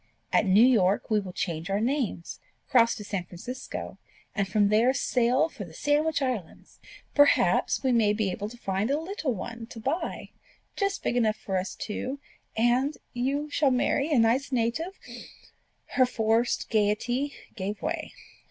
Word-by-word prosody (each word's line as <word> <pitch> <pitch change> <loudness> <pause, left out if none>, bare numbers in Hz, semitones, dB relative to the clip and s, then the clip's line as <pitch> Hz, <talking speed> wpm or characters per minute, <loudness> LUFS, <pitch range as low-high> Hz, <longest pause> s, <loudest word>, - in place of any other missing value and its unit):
At 210 - +3
New 200 +5 +6
York 210 -5 +3
we 215 - +4
will 195 -3 -6
change 170 -1 -3
our 195 +1 +1
names, 235 - -2 0.3
cross 235 -2 +4
to 210 - -7
San 195 -3 -3
Francisco, 245 +10 -7 0.3
and 200 -2 0
from 205 +1 +2
there 230 +5 +3
sail 250 +3 +2
for 225 - -8
the 165 -4 -12
Sandwich 295 - +1
Islands. 235 -11 -5 0.3
Perhaps 290 -1 +4
we 260 - +2
may 225 -4 +4
be 210 -2 0
able 205 +3 -4
to 240 - -12
find 195 0 -1
a 285 +2 +1
little 320 - -3
one 230 +3 -7
to 230 - -10
buy, 315 +9 -3 0.4
just 395 -1 -1
big - - 0
enough 220 -3 +2
for 190 - -4
us 185 0 -2
two; 260 +6 -4 0.4
and 250 +6 +2 0.2
you 275 +4 -1
shall 290 -1 +3
marry 270 +4 +1
a 290 - +4
nice 235 +5 +2
native 255 +10 -1 0.5
" - - -35
Her 255 -1 +6
forced 225 0 0
gaiety 235 +6 0 0.2
gave 205 0 -4
way. 320 0 -3
235 Hz, 165 wpm, -27 LUFS, 210-275 Hz, 0.5 s, New